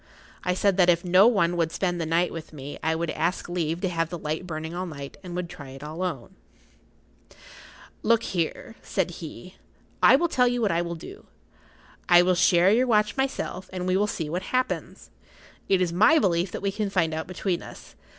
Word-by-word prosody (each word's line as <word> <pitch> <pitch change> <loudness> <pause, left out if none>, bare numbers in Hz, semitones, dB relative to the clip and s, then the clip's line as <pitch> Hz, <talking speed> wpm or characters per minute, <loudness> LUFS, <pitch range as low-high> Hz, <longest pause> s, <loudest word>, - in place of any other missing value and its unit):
I 180 0 0
said 195 0 +2
that 180 -2 +5
if 170 0 +2
no 185 +4 +6
one 195 -7 +2
would 165 -1 +1
spend 175 -1 -1
the 160 - -2
night 170 +2 +1
with 160 -1 -8
me 145 -1 -8
I 160 0 0
would 165 0 -2
ask 165 +4 -1
leave 170 -1 -2
to 190 - 0
have 165 -2 -1
the 175 - -5
light[Pg 150 - -7
53] 180 - -11
burning 160 0 -5
all 180 +1 -3
night, 140 -4 -8
and 180 -2 -8
would 180 -1 -3
try 145 -5 -10
it 135 +2 -10
alone. 160 -1 -5 1.7
"Look 230 0 +3
here," 175 +5 -3
said - - -1
he, - - -10 0.4
"I - - +8
will 340 +5 +2
tell 250 -6 +2
you 245 0 0
what 215 -4 +1
I 170 +1 +1
will 170 0 -4
do. 385 - -11 0.8
I 175 0 +7
will 185 +1 +3
share 175 +1 +4
your 250 +4 +3
watch 210 -2 +2
myself, 265 -8 -3
and 180 -1 -4
we 185 0 +1
will 205 +2 +2
see 165 -6 -3
what 175 +4 -3
happens. 255 0 -2 0.6
It 190 -1 +3
is 175 -2 0
my 220 - +5
belief 180 - +1
that - - -6
we 200 - +1
can 205 0 -2
find 170 -5 +1
out 160 0 -4
between 185 -1 -2
us. - - -12
180 Hz, 210 wpm, -25 LUFS, 165-195 Hz, 1.7 s, I